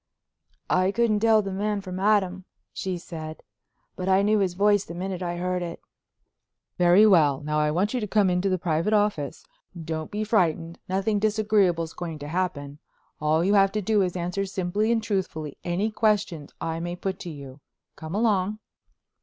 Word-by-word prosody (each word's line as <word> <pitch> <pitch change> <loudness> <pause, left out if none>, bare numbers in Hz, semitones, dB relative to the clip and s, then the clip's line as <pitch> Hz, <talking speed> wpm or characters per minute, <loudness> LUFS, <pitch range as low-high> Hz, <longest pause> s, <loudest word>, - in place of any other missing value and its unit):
"I 185 +1 +3
couldn't 225 -1 +2
tell 220 -1 +4
the 195 - -4
man 205 +2 -1
from 185 -1 -6
Adam," 190 -2 +1 0.3
she 185 -2 -3
said, 160 -2 -8 0.5
"but 185 0 -3
I 190 +1 +4
knew 210 +1 +3
his 185 -3 0
voice 205 +1 +3
the 170 - -9
minute 185 +1 -4
I 175 -1 -3
heard 180 +1 -1
it." 170 -1 -5 1.0
"Very 180 +4 +6
well. 155 -9 +4
Now 150 +1 -1
I 150 0 +2
want 185 +9 0
you 255 - 0
to 210 - -3
come 205 -1 +3
into 180 +2 +1
the 185 - +1
private 170 +4 0
office. 205 -10 0 0.3
Don't 160 -1 -4
be 210 +1 -3
frightened; 170 -6 0
nothing 195 +3 0
disagreeable's 205 -6 +1
going 165 -3 -5
to 145 0 -8
happen. 150 -4 -3 0.4
All 155 +2 +2
you 195 +3 +2
have 195 -1 +5
to 215 - 0
do 210 +1 +2
is 180 -2 0
to 180 - -4
answer 180 +3 -2
simply 190 +4 -1
and 225 -1 +1
truthfully 185 -8 -3
any 185 +5 -1
questions 205 -9 0
I 165 0 -3
may 175 +1 -4
put 190 +1 -4
to 180 - -6
you. 140 -3 -10 0.4
Come 160 +3 -7
along." 210 -2 +1
185 Hz, 185 wpm, -25 LUFS, 170-205 Hz, 1.0 s, Very